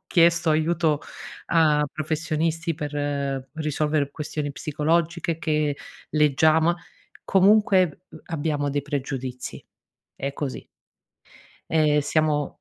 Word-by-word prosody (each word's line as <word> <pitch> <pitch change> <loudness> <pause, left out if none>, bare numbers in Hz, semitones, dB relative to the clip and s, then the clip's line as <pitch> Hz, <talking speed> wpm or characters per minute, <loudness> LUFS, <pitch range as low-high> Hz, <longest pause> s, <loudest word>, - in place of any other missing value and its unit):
chiesto 170 -1 +4
aiuto 160 -1 +1 0.5
a 155 -3 +3
professionisti 160 +1 -1
per 145 -3 -3
risolvere 150 -2 0
questioni 150 -1 -4
psicologiche, 165 +3 -1
che 150 -3 0 0.3
leggiamo 155 +3 +3 0.5
comunque, 190 -4 +4
uhm, - - -12
abbiamo 150 -3 -1
dei 145 0 -1
pregiudizi. 130 -3 -5 0.5
È 140 +1 -4
così. 140 -1 -5 1.0
Ehm, 150 -2 +3
siamo 150 -1 0
155 Hz, 90 wpm, -24 LUFS, 145-165 Hz, 1.0 s, chiesto